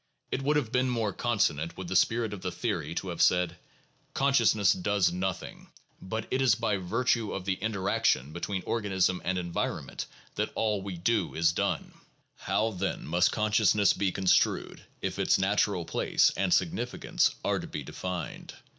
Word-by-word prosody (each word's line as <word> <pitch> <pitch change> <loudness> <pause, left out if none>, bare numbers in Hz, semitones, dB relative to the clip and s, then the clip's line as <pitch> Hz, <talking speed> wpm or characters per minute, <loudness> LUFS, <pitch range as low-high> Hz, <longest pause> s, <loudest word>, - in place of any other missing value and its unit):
It 135 - -1
would 145 +2 +1
have 125 -7 -1
been 130 0 +2
more 115 -5 -1
consonant 85 -10 0
with 95 -1 -6
the 95 - -3
spirit 110 +4 +2
of 100 - -7
the - - -3
theory 85 - -3
to 95 - -3
have 85 - -3
said: 90 -1 +3 0.6
Consciousness 115 -8 +4
does 95 -1 +1
nothing, 90 +1 -4 0.3
but 110 +4 -4
it 130 - +1
is 130 - +4
by 105 - 0
virtue 115 +4 0
of 95 -2 -5
the 95 - +1
interaction 95 -9 0
between 90 +2 -3
organism 95 -5 0
and 95 +1 -1
environment 85 -1 -3 0.3
that - - -1
all 105 -3 0
we 95 -2 -6
do 100 +2 0
is 80 0 +3
done; - - -2 0.4
how, 110 +1 0
then, 95 -1 -3
must 90 +3 +2
conscious 105 -2 +2
ness 105 -2 +4
be 100 -2 0
construed 95 -1 +1 0.2
if - - -3
its - - +3
natural - - +1
place - - +2
and - - 0
significance - - +1
are - - +1
to - - -7
be - - -5
defined? 90 -3 -6
95 Hz, 170 wpm, -29 LUFS, 90-110 Hz, 0.6 s, Consciousness